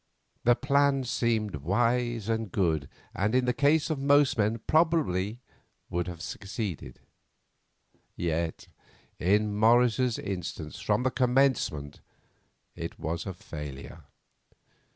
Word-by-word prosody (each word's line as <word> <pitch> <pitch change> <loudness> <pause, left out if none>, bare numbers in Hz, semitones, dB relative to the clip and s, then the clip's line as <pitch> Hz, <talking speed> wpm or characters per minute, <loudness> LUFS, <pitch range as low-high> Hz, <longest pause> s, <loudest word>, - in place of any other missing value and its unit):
The 120 0 +6
plan 140 0 +2
seemed 115 - 0
wise 115 - 0
and 110 -3 -1
good, 80 -8 0 0.2
and, 105 +5 0
in 130 -1 +3
the 125 - +1
case 145 +4 +2
of 150 - -1
most 140 0 +4
men, 110 +1 +1
probably 135 - +1 0.5
would 90 0 -1
have 85 -1 -7
succeeded. 95 - -5 1.1
Yet 85 -1 -2 0.5
in 105 +4 +2
Morris's 120 +2 +3
instance 90 -5 -5
from 105 +3 0
the 130 - +1
commencement 125 - +1 0.7
it - - -6
was 85 +5 -4
a 95 - -3
failure. 75 -5 -9
110 Hz, 110 wpm, -28 LUFS, 90-125 Hz, 1.1 s, The